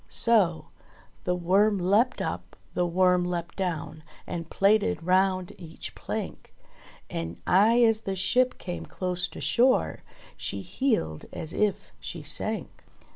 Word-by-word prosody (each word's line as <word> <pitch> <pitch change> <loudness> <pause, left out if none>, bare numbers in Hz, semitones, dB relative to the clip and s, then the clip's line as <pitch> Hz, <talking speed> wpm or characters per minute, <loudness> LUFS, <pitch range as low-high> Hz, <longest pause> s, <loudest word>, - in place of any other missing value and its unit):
So: 205 -8 +3 0.6
"The 180 - +1
Worm 195 +4 +3
leapt 205 +8 +2
up, - - -5 0.2
the 180 0 +1
Worm 180 +1 +3
leapt 175 -1 -3
down 170 -4 -3 0.2
And 165 -1 -5
plaited 215 0 +2
round 185 0 +2
each 165 -3 -8
plank, - - -6 0.5
And 85 +1 -5
aye 225 +6 +5
as 225 -1 +4
the 195 -3 -3
ship 250 +7 +2
came 80 -2 -6
close 180 -1 -2
to - - -10
shore 255 +2 +2
K - - -26 0.2
She - - -3
heeled 220 - -1
as 160 - -6
if 210 -2 0
she - - -6
sank." - - -3
185 Hz, 135 wpm, -27 LUFS, 175-215 Hz, 0.6 s, aye